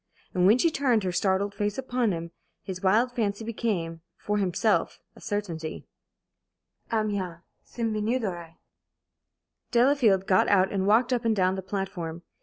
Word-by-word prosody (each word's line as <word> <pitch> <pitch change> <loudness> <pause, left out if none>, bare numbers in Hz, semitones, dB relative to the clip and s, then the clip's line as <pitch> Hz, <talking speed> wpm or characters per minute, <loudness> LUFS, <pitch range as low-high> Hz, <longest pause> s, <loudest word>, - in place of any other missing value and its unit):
And 180 0 +3
when 215 +4 +6
she 330 +5 +2
turned 255 -8 +2
her 185 - -1
startled 195 +2 0
face 205 0 -2
upon 250 -4 0
him, 170 -1 -5 0.3
his 185 -1 -6
wild 220 +6 +3
fancy 220 -3 -2
became, 195 -8 -2 0.2
for 210 0 -1
himself, 200 +3 +1 0.2
a - - -16
certainty. 170 -7 -4 1.1
"Amiens! 200 -6 -1 0.2
Cinq 230 -2 -3
minutes 220 +3 0
d'arrêt." 170 -3 -6 1.1
Delafield 235 -6 +3
got 185 -1 +3
out 190 -1 +3
and 195 -1 -1
walked 235 +5 +4
up 245 -1 0
and 225 -1 +2
down 185 -1 +2
the 190 - -3
platform. 185 -4 -5
205 Hz, 150 wpm, -27 LUFS, 185-230 Hz, 1.1 s, when